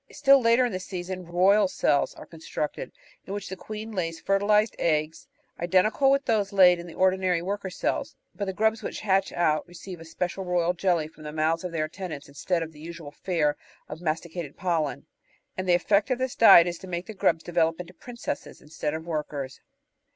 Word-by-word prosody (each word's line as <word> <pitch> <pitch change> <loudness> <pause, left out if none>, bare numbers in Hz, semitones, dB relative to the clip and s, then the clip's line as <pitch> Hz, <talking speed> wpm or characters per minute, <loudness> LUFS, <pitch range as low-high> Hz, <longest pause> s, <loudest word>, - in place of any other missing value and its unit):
Still 275 -2 +5
later 235 +2 +4
in 245 - -2
the 185 - -3
season 185 -1 -6
"royal" 190 +4 +4
cells 145 -5 +1
are - - -11
constructed, 160 -2 -5 0.4
in 195 - -4
which 205 -1 -6
the 190 - -5
queen 215 +4 -7
lays 165 -5 -3
fertilised 205 +3 +2
eggs, 155 -1 0 0.3
identical 190 +10 +3
with 275 0 +2
those 215 -4 +1
laid 180 -3 +6
in 170 - -8
the 165 - -11
ordinary 185 -2 +2
worker 200 +1 -3
cells, - - -2 0.2
but 200 - -4
the 190 - -2
grubs 220 +3 +1
which - - -5
hatch 195 -2 +1
out 155 -2 +1
receive 175 0 -9
a 165 - -11
special 180 +3 -3
"royal 180 -1 +1
jelly" 175 -3 +1
from 155 - -18
the 150 0 -6
mouths 160 +2 0
of 180 - -4
their 160 -2 -1
attendants, 160 -3 -7
instead 165 +5 -1
of 160 - -8
the 150 - -16
usual 165 -2 -8
fare 150 -2 0 0.3
of 155 - -8
masticated 165 -1 -4
pollen, 165 -6 -1 0.5
and 185 0 -3
the 175 - +6
effect 200 +6 +2
of 255 - +1
this 260 0 -2
diet 195 -7 +9
is 175 -1 -4
to 190 - -10
make 175 0 -4
the 220 - -8
grubs 190 -5 +1
develop 165 -1 +1
into 180 0 -8
"princesses" 240 +6 -6
instead 150 0 -4
of 160 +1 -6
workers. 145 -5 -4
180 Hz, 200 wpm, -26 LUFS, 165-195 Hz, 0.5 s, diet